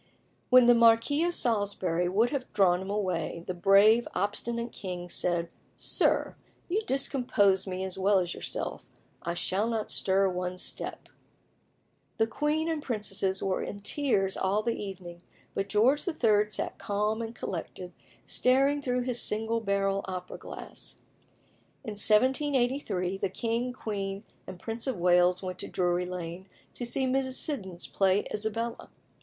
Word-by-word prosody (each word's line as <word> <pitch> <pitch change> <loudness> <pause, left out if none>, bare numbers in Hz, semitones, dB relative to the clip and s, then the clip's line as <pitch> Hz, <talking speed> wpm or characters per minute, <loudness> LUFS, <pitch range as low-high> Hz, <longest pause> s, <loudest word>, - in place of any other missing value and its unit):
When 255 -1 +7
the 240 - +7
Marquis 235 +6 +4
of 350 0 0
Salisbury 195 -6 0
would 220 +6 +2
have 275 -3 -3
drawn 185 -3 +3
him 190 - -6
away, 180 -5 -2
the 185 - -3
brave, 200 +6 +5
obstinate 235 +4 -2
king 180 -3 -6
said 175 -1 0 0.3
"Sir, - - +1 0.3
you 390 +5 0
discompose 220 -8 +2
me 185 0 -3
as 190 0 -4
well 200 +1 +4
as 180 -1 0
yourself: - - -4 0.4
I 170 - -3
shall 195 +5 0
not 225 -2 -1
stir 195 0 +3
one 180 0 -3
step." - - -5 1.1
The 225 - +3
queen 300 +7 -1
and 320 -2 -1
princesses 195 -6 -2
were 190 -1 0
in - - -5
tears 200 -6 0
all 200 +3 0
the 235 - 0
evening, 180 -5 -7 0.3
but 195 0 -2
George 245 - +3
III. 215 -10 +2
sat 210 - -4
calm 210 +2 -1
and 230 +1 -6
collected, 180 -1 -6 0.3
staring 275 +3 +3
through 250 -2 0
his 245 -1 +1
single 225 +2 +1
barrel 200 -2 0
opera 180 -1 -6
glass. - - -8 0.9
In 220 - -5
1783 240 -3 +2
the - - 0
king, 230 +5 -2
queen, 200 -4 -4 0.2
and 180 - -8
Prince 225 +5 -4
of 260 -6 -1
Wales 180 +1 +3
went 185 -1 -5
to - - -4
Drury 180 0 0
Lane 180 +1 -6 0.3
to 245 - -5
see 265 +2 0
Mrs. 260 0 0
Siddons 190 - -3
play 195 +1 +2
Isabella. 225 +2 -3
205 Hz, 150 wpm, -29 LUFS, 185-240 Hz, 1.1 s, When